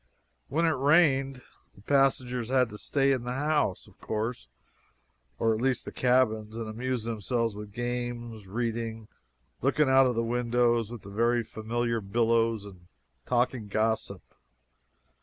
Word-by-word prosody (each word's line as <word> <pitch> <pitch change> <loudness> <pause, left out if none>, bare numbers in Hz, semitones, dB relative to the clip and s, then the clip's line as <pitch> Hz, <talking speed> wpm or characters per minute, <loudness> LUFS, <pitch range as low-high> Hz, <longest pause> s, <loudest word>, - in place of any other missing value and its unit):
When 165 +5 +1
it 165 - +3
rained 135 -3 +3 0.3
the 100 - -18
passengers 125 -3 +1
had 130 -2 +3
to 105 - -9
stay 140 -1 +1
in 130 -3 0
the 125 +1 -3
house, 145 -8 0
of - - -21
course 110 - -4 0.9
or 115 -1 +2
at 110 - -3
least 130 -1 0
the - - -6
cabins 110 -4 +1
and 115 -1 -4
amuse 120 +2 -3
themselves 115 0 -1
with 105 0 -8
games, 120 -2 -4
reading, 115 0 -3 0.5
looking 135 +2 +2
out 130 0 +6
of 125 - -1
the 115 - +1
windows 120 -1 +1
at 120 -3 -8
the 100 - -10
very 120 +3 +2
familiar 115 +1 -2
billows, 115 +1 +1
and 90 -3 -13 0.4
talking 120 -2 0
gossip. 110 +2 -1
120 Hz, 145 wpm, -28 LUFS, 110-130 Hz, 0.9 s, out